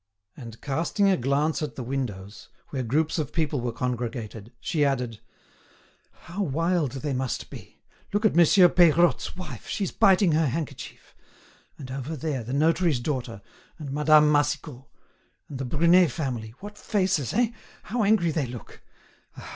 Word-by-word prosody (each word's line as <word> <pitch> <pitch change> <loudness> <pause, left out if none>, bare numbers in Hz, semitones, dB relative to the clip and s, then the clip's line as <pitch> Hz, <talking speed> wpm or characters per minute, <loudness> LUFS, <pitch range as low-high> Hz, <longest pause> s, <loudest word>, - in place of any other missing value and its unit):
And 115 -3 -10
casting 165 +8 0
a - - +4
glance 140 +4 0
at 150 - -4
the 130 - -5
windows, 110 -6 -5 0.2
where 135 - -3
groups 150 +8 0
of 150 -2 -3
people 150 -4 -1
were 120 0 -2
congregated, 120 -3 -4
she 155 -3 0
added: 125 -6 -1 1.0
"How 180 +5 -6
wild 165 -3 0
they 140 +1 -3
must 130 -1 -3
be! - - -12 0.3
Look 205 +2 0
at 215 - +4
Monsieur 175 +2 +6
Peirotte's 175 0 +3
wife, 185 - -8
she's 195 -3 -2
biting 190 -2 +4
her 155 0 +2
handkerchief. 155 +3 -6 0.6
And 130 -3 -9
over 135 +4 -4
there, 145 -4 -3
the 120 - -7
notary's 160 0 +2
daughter, 120 -6 -4 0.3
and 150 -5 -7
Madame 150 +1 +5
Massicot, 145 -2 -1 0.6
and 135 - -7
the 135 - -3
Brunet 170 +5 +4
family, 120 -6 -4
what 205 +1 -10
faces, 185 - 0
eh? 235 0 +2 0.3
how 235 0 -1
angry 200 -5 +3
they 150 -4 -1
look! 120 -1 -10
145 Hz, 150 wpm, -26 LUFS, 125-170 Hz, 1.0 s, Monsieur